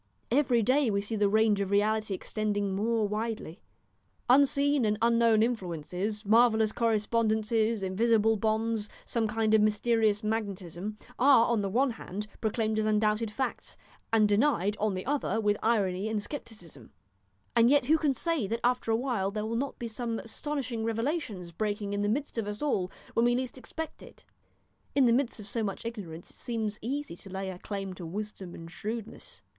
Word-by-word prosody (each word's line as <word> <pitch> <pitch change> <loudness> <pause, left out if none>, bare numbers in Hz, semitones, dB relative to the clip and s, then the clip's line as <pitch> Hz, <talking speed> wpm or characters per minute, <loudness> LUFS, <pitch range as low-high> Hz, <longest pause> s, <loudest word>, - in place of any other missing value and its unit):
Every 245 -3 +3
day 260 +3 +3
we 200 -1 +1
see 205 +3 -3
the 205 -1 +2
range 215 -1 +3
of 195 - -1
reality 210 0 +1
extending 205 0 -2
more 220 +1 +1
widely. 215 -5 -4 0.7
Unseen 280 +1 +4
and 210 -1 +1
unknown 230 -1 +4
influences, 195 -1 -3
marvellous 220 0 +4
correspondences, 220 -1 +1
invisible 220 +3 +3
bonds, 220 0 0 0.2
some 230 -2 0
kind 220 0 +1
of 220 - +6
mysterious 215 0 +2
magnetism, 205 -2 -3 0.2
are, 265 -3 +6
on 235 -3 +1
the 200 - -1
one 255 +6 +2
hand, 210 -2 -6 0.2
proclaimed 220 -1 0
as 215 - +1
undoubted 215 +1 +2
facts, 260 +5 -4 0.3
and 220 -2 +5
denied 205 -2 +2
on 210 -2 0
the 185 - -4
other 265 -6 0
with 210 -1 +2
irony 205 -3 +1
and 220 -1 0
scepticism, 175 - -9 0.7
and 235 0 +6
yet 285 -2 +4
who 315 +4 +4
can 300 -3 +2
say 320 - 0
that 230 +3 -2
after 245 -1 +1
a 225 - +4
while 235 -6 -1
there 210 +1 -3
will 225 +1 -2
not 275 +3 -2
be 235 - -4
some 230 0 -3
astonishing 250 -1 -4
revelations 230 - -2
breaking 205 +2 -2
in 205 0 -2
in - - 0
the 205 - +1
midst 270 +1 -2
of 215 - -2
us 210 0 -4
all 190 -11 0 0.2
when 230 - +2
we 240 0 +4
least 255 0 -3
expect 315 +4 -7
it? - - -15 0.7
In 275 -2 +5
the 235 - +5
midst 250 -2 0
of 205 - -9
so 230 +2 -2
much 200 +2 -4
ignorance 185 -8 -7
it - - -18
seems 220 -4 -3
easy 275 -2 -3
to 195 - -12
lay 190 0 -4
a 180 - -9
claim 195 -2 -5
to 180 -1 -8
wisdom 195 -1 -6
and 165 0 -10
shrewdness. 220 +3 -6
220 Hz, 180 wpm, -29 LUFS, 205-235 Hz, 0.7 s, of